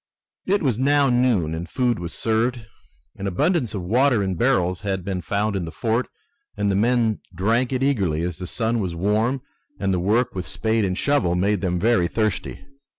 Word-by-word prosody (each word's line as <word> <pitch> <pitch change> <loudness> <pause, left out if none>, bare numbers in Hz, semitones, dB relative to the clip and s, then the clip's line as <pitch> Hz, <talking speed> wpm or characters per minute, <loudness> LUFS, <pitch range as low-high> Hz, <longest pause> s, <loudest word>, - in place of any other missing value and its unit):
It 200 0 +2
was 125 -5 +1
now 140 0 +3
noon, 120 -10 +2
and 85 +1 -5
food 125 -1 0
was 85 0 -5
served. 115 +1 -1 0.5
An 100 - -4
abundance 120 - 0
of 95 - -3
water 120 +3 +3
in 95 -1 -1
barrels 90 -4 +1
had 95 -3 -3
been 95 -2 -2
found 100 +5 -1
in 95 - -1
the 80 - -7
fort 115 +8 -1 0.5
and 100 -1 +1
the - - +1
men 115 +1 +2 0.2
drank 115 +8 +1
it 130 0 0
eagerly 95 - +1
as 90 -2 -4
the 90 - -5
sun 115 +4 -1
was 90 -5 -3
warm 110 +8 0 0.4
and 95 -1 0
the 90 - +1
work 110 +7 +1
with 90 -1 -4
spade 110 -1 0
and 90 -1 -2
shovel 120 -12 +1
made 100 +2 +1
them 90 -2 0
very 110 -4 +3
thirsty. 110 -9 -2
105 Hz, 195 wpm, -23 LUFS, 90-120 Hz, 0.5 s, now